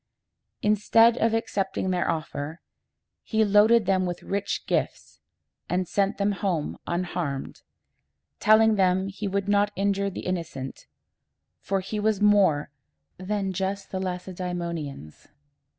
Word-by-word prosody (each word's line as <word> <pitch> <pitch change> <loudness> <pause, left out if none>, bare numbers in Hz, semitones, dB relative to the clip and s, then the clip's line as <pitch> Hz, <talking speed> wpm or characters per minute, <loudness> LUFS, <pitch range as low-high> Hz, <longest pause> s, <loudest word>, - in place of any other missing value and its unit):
Instead 225 +2 +4
of 225 - +3
accepting 195 -4 -1
their 180 -1 0
offer, 155 -1 -4 0.6
he 220 -1 +1
loaded 210 +2 +5
them 185 -1 +2
with 175 0 -5
rich 200 +1 -2
gifts, - - -2 0.5
and 180 0 0
sent 200 +2 0
them 200 0 +1
home 180 -6 -2
unharmed, 170 -5 -3 0.8
telling 220 0 +5
them 190 0 +2
he 200 +1 -5
would 200 0 -1
not 205 0 +3
injure 200 0 0
the 190 - -7
innocent, 165 -7 -5 0.7
for 195 -1 -1
he 210 +3 -4
was 210 -1 +1
more 195 -9 +3 0.8
just 195 +1 -3
than 190 - -3
the - - -2
Lac 180 0 -5
e - - -5
dæ 180 0 -4
mo´ni 170 -4 -3
ans. 75 - -13
195 Hz, 135 wpm, -26 LUFS, 175-205 Hz, 0.8 s, loaded